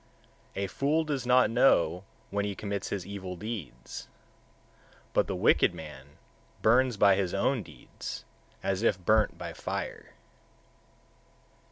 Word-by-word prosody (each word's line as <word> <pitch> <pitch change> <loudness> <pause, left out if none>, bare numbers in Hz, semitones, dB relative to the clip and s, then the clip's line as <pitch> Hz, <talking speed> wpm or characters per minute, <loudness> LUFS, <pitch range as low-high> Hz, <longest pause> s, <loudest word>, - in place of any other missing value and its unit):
136. 100 - -2
A 100 - -5
fool 150 +4 +3
does 140 -5 -3
not 125 -1 +5
know 115 -7 +4 0.3
when 100 0 0
he 100 -1 -2
commits 100 0 -3
his 95 -4 -3
evil 95 -2 -6
deeds: 85 - -7 1.1
but - - +3
the - - -2
wicked - - +4
man 75 -2 -11 0.5
burns 125 +1 +4
by 100 -1 +6
his 95 -2 -1
own 125 +5 +1
deeds, 90 - -8 0.4
as 95 0 0
if 110 -4 +3
burnt 110 0 +3
by - - -6
fire. - - -5
100 Hz, 135 wpm, -29 LUFS, 90-120 Hz, 1.1 s, by